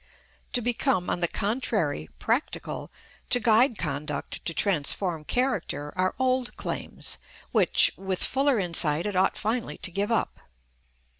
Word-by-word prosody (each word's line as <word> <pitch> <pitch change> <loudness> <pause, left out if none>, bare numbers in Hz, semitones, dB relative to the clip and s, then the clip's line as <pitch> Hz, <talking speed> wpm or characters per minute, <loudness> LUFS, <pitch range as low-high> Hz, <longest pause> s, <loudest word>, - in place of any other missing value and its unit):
To 245 - +4
become, 240 -5 0
on - - -1
the 170 - +3
contrary, 200 - -1
practical, 240 +6 -2 0.4
to 245 - +4
guide 230 +1 +4
conduct, 145 -1 -4
to - - 0
transform 175 -2 +1
character, 205 - -1
are 185 0 0
old 255 -1 0
claims, - - -3 0.3
which - - +5
with 190 -1 -1
fuller 270 -1 +2
insight 170 -4 +2
it 205 -2 -2
ought 185 - +2
finally 230 +2 -2
to 185 - -2
give 200 +5 -1
up. 230 - 0
200 Hz, 135 wpm, -26 LUFS, 170-245 Hz, 0.4 s, which